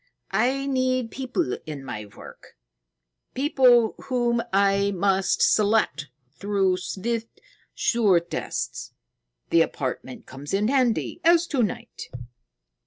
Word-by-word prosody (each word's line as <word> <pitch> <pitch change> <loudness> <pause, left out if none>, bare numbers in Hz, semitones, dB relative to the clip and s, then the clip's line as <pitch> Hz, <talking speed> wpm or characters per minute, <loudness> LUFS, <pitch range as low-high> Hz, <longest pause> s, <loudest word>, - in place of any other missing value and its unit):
"I 255 +6 +1
need 255 -3 0
people 265 +6 -2
in 145 -3 -7
my 105 -5 -6
work, 100 - -14 0.8
people 250 -5 +4
whom 240 -3 +1
I 200 0 +3
must 195 0 +1
select 210 -9 +2 0.3
through 195 -2 +1
swift, 225 +5 -4 0.4
sure 210 -7 +3
tests. 60 - -5 0.6
The 165 - +5
apartment 130 -4 -3
comes 140 +7 -5
in 210 +3 +1
handy, 260 +4 0
as 340 0 +5
to 265 - +2
night." 210 - -4
210 Hz, 105 wpm, -24 LUFS, 185-255 Hz, 0.8 s, The